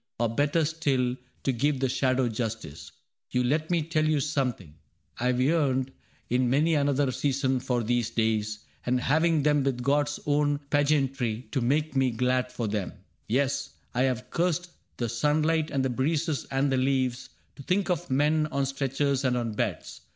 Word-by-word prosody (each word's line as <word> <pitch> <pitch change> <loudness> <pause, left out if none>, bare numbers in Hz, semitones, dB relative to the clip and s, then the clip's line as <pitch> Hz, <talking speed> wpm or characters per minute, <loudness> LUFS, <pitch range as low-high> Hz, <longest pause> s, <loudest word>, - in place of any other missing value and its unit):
Or 120 -1 +2
better 145 +5 +2
still, 135 -6 0 0.3
to 135 - +2
give 135 +3 0
the 135 - +1
shadow 130 0 +1
justice. 105 - -5 0.4
You 125 0 +1
let 155 +5 0
me 170 -3 +1
tell 155 0 0
you 155 -1 +2
something: 130 - -2 0.5
I 125 - 0
have 125 0 +1
yearned 135 -2 +2 0.4
In 125 0 +1
many 150 +6 +3
another 140 -2 +2
season 135 -1 0
for 125 -1 -1
these 120 0 0
days. 110 -2 -1 0.2
And 125 +1 +1
having 155 +3 +2
them 150 -1 +3
with 130 -3 -1
God's 145 +2 +1
own 145 0 +2
pageantry 135 -6 +1
To 135 - 0
make 145 +4 0
me 135 -1 +3
glad 125 +2 0
for 115 - -3
them, 105 -2 -2 0.2
— - - -44
yes, 135 +4 0 0.2
I 125 - 0
have 125 0 -5
cursed 175 0 0 0.3
The 120 - -1
sunlight 155 +6 +1
and 135 -2 0
the 130 - 0
breezes 150 +4 0
and 135 +1 0
the 130 - +2
leaves 130 -1 0 0.3
To - - -9
think 185 +6 0
of 175 0 -2
men 150 +3 +2
on 140 -1 0
stretchers 135 0 -1
and 125 -2 +1
on 115 -2 -2
beds. - - -3
135 Hz, 175 wpm, -27 LUFS, 125-150 Hz, 0.5 s, many